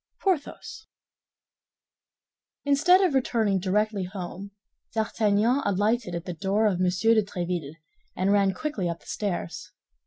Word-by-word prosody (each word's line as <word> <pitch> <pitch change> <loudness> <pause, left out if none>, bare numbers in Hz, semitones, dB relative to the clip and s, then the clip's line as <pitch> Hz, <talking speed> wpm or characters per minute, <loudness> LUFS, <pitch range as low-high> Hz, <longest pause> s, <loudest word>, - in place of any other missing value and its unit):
PORTHOS 380 +4 -2 1.8
Instead 310 +7 +5
of 365 -6 +2
returning 225 -7 +1
directly 200 +1 0
home, 190 +1 -7 0.5
D'Artagnan 220 +3 +2
alighted 205 -1 0
at 170 - -5
the 180 - -4
door 200 +5 0
of 195 -4 +1
M. 185 - +2
de 220 +5 +3
Tréville, 175 -6 -4 0.4
and 190 +2 +2
ran 200 -1 +3
quickly 205 - -2
up 170 0 -5
the - - -22
stairs. 175 -5 -4
200 Hz, 125 wpm, -26 LUFS, 180-230 Hz, 1.8 s, Instead